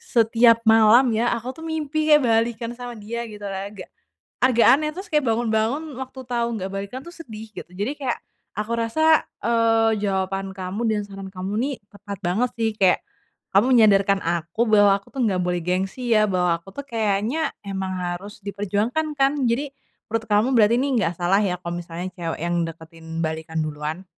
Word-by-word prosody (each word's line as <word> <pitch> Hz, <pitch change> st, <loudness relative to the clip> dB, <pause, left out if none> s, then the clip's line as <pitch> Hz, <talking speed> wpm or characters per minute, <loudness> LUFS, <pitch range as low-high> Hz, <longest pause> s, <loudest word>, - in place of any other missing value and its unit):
setiap 230 Hz, 0 st, +5 dB
malam 225 Hz, +3 st, +7 dB
ya 230 Hz, -, +1 dB
aku 235 Hz, +2 st, -6 dB
tuh -, -, -8 dB
mimpi 310 Hz, -1 st, -2 dB
kayak 300 Hz, -2 st, +6 dB
balikan 230 Hz, 0 st, +1 dB
sama 245 Hz, -1 st, -6 dB
dia 230 Hz, +3 st, -5 dB
gitu 210 Hz, -1 st, -10 dB
agak, 195 Hz, 0 st, -6 dB, 0.5 s
agak 250 Hz, -2 st, +4 dB
aneh 305 Hz, +3 st, +2 dB
terus 380 Hz, +4 st, -8 dB
bangun-bangun 230 Hz, -1 st, +1 dB, 0.2 s
waktu 260 Hz, 0 st, -7 dB
tau 235 Hz, -1 st, +1 dB
nggak 190 Hz, -3 st, -4 dB
balikan 200 Hz, +6 st, -5 dB
itu 345 Hz, -, -10 dB
sedih 220 Hz, -6 st, -8 dB
gitu. -, -, -8 dB
Jadi 205 Hz, +8 st, -2 dB
kayak, 255 Hz, -3 st, -1 dB, 0.4 s
aku 215 Hz, +2 st, -2 dB
rasa, 315 Hz, +8 st, +3 dB, 0.2 s
eee, 225 Hz, -1 st, +3 dB
jawaban 195 Hz, -1 st, -1 dB
kamu 190 Hz, +3 st, -5 dB
dan 215 Hz, -1 st, 0 dB
saran 195 Hz, -1 st, -8 dB
kamu 190 Hz, +1 st, -5 dB
nih 275 Hz, +2 st, -1 dB, 0.2 s
tepat 200 Hz, -1 st, -8 dB
banget 215 Hz, +8 st, +1 dB
sih 225 Hz, -1 st, +1 dB
kayak, 190 Hz, -3 st, +3 dB, 0.5 s
kamu 200 Hz, +5 st, +5 dB
menyadarkan 200 Hz, -3 st, +4 dB
aku 170 Hz, +4 st, -2 dB
bahwa 205 Hz, -2 st, +5 dB
aku 200 Hz, -, -13 dB
tuh 270 Hz, -, -3 dB
nggak 190 Hz, -4 st, +1 dB
boleh 180 Hz, -1 st, -1 dB
gengsi 190 Hz, +7 st, -1 dB
ya, 215 Hz, -, +5 dB
bahwa 180 Hz, -3 st, +1 dB
aku 180 Hz, -, -20 dB
tuh 280 Hz, -, -5 dB
kayaknya 225 Hz, +7 st, 0 dB
emang 190 Hz, -1 st, -3 dB
harus 180 Hz, +4 st, -5 dB
diperjuangkan 205 Hz, +10 st, -1 dB
kan? 270 Hz, 0 st, +4 dB, 0.2 s
Jadi, 270 Hz, +5 st, 0 dB, 0.4 s
menurut 225 Hz, +1 st, -2 dB
kamu 210 Hz, +4 st, +3 dB
berarti 220 Hz, 0 st, +5 dB
ini 275 Hz, -, 0 dB
nggak 170 Hz, -4 st, 0 dB
salah 190 Hz, +3 st, +3 dB
ya 190 Hz, -4 st, 0 dB
kalau 170 Hz, -1 st, -5 dB
misalnya 175 Hz, +2 st, -6 dB
cewek 165 Hz, -3 st, -4 dB
yang 170 Hz, 0 st, 0 dB
deketin 165 Hz, 0 st, -12 dB, 0.2 s
balikan 160 Hz, 0 st, -3 dB
duluan? 155 Hz, +4 st, -5 dB
210 Hz, 175 wpm, -23 LUFS, 190-235 Hz, 0.5 s, malam